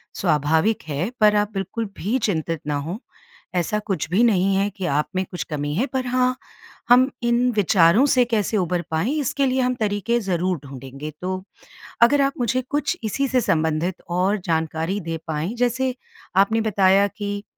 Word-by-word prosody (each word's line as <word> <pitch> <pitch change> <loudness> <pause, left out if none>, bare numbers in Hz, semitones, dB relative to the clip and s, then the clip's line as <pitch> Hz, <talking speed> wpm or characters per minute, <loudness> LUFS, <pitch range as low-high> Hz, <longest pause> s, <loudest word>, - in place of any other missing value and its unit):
स्वाभाविक 160 +5 +1
है 155 +8 -2
पर 210 -1 +5
आप 205 +1 +1
बिल्कुल 195 +4 -3
भी 220 +9 0
चिंतित 165 -6 -1
ना 145 - 0
हों, 160 +8 -4 0.6
ऐसा 180 +4 0
कुछ 195 -6 -3
भी 200 +6 +3
नहीं 195 -3 +3
है 200 +1 +2
कि 185 -2 -3
आप 150 -1 +1
में 185 - +1
कुछ 180 - -4
कमी 145 -1 -3
है 240 +10 +1
पर 260 -2 -3
हाँ, 255 +1 +1 0.5
हम 255 +3 +6
इन 240 +1 +2
विचारों 195 - +4
से 255 -3 +4
कैसे 220 -2 0
उभर 180 -2 0
पाएँ 170 - 0
इसके 275 0 0
लिए 260 0 +1
हम 250 0 +1
तरीके 215 +1 0
ज़रूर 180 -3 -1
ढूँढेंगे। 135 +2 -8
तो 185 +1 -3 0.6
अगर 280 +4 +5
आप 275 0 +2
मुझे 250 +2 +1
कुछ 290 -1 -1
इसी 275 +6 -1
से 255 -1 +1
संबंधित 160 -1 0
और 185 +4 +1
जानकारी 160 +3 -1
दे 165 -2 -4
पाएँ, 160 +7 -2
जैसे 250 +1 0 0.4
आपने 220 +4 +3
बताया 200 -2 +3
कि 205 0 -4
200 Hz, 175 wpm, -22 LUFS, 170-235 Hz, 0.6 s, हम